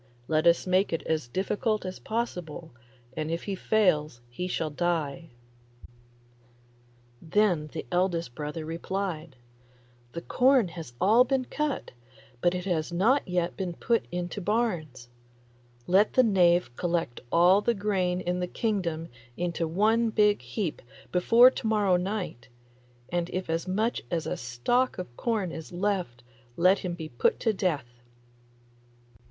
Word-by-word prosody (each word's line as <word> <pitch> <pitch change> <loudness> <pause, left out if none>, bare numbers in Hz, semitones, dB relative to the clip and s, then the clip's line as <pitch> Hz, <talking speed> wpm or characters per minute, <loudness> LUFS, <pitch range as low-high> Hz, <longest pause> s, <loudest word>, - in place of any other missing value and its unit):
Let 155 +1 +2
us 170 0 +4
make 185 +2 +2
it 165 - -2
as 155 -5 -1
difficult 205 - -1
as 185 0 -5
possible, 180 -8 -4 0.4
and 155 0 -3
if 165 +1 -2
he 200 - -3
fails 180 - +1
he 180 +9 -4
shall 160 -3 -2
die.' 165 -1 -2 1.9
Then 175 -3 +1
the 155 +1 -6
eldest 175 -6 0
brother 150 +3 -5
replied, 165 -2 -4 0.8
'The 170 - -6
corn 255 -6 +3
has 165 -7 -9
all 220 +6 +6
been 260 0 0
cut, 300 0 -3 0.5
but 175 +1 +2
it 180 0 -4
has 170 -4 -1
not 225 +11 +2
yet 180 -1 -1
been 185 -3 -3
put 230 +6 0
into 180 +3 -4
barns; 175 - -1 0.8
let 195 +4 +3
the 255 - +5
knave 175 - +3
collect 170 -7 -2
all 180 +4 +5
the 235 +2 +1
grain 190 -3 0
in 180 0 -1
the 180 - -1
kingdom 175 -6 -2 0.3
into 170 -1 -1
one 220 +7 +2
big 210 -1 +3
heap 195 -9 -4 0.3
before 230 +8 +6
to 230 - -4
morrow 205 -4 +3
night, 180 - -3 0.6
and 175 0 -1
if 185 -2 -3
as 165 +2 -2
much 215 +6 0
as 165 -2 -1
a - - -2
stalk 170 - 0
of 150 -10 -7
corn 215 - -1
is 160 -1 -8
left 180 -9 -2 0.3
let 185 +3 +4
him 180 -2 -4
be 160 -2 -6
put 120 - +1
to 225 - +2
death. 140 - -2
180 Hz, 145 wpm, -27 LUFS, 165-205 Hz, 1.9 s, all